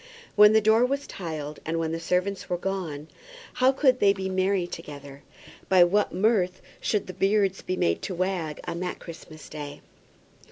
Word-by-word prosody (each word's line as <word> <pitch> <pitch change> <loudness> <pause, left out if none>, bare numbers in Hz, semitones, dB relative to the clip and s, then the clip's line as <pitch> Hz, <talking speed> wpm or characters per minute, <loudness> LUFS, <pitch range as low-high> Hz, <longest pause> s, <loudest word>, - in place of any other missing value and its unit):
When 210 0 +8
the 220 - +5
door 220 +2 +4
was 275 +3 0
tiled, 155 -4 -6
and 165 +1 -2
when 165 -1 -1
the 165 - -3
servants 180 +3 -1
were 175 - 0
gone, 175 -6 -4 0.5
how 260 +1 +6
could 260 -2 +3
they 200 -1 +5
be 190 -1 -4
merry 185 0 +1
together? 145 -5 -9 0.5
By 185 -2 +7
what 200 +4 +2
mirth 190 -2 +1 0.2
should 210 -3 0
the 185 - -8
beards 195 +1 +1
be 185 - -3
made 85 - +1
to 185 - -4
wag 175 -4 -2
on 170 - -4
that 180 0 -3
Christmas 160 -2 -11
Day? 145 -2 -8
185 Hz, 175 wpm, -26 LUFS, 165-200 Hz, 0.5 s, When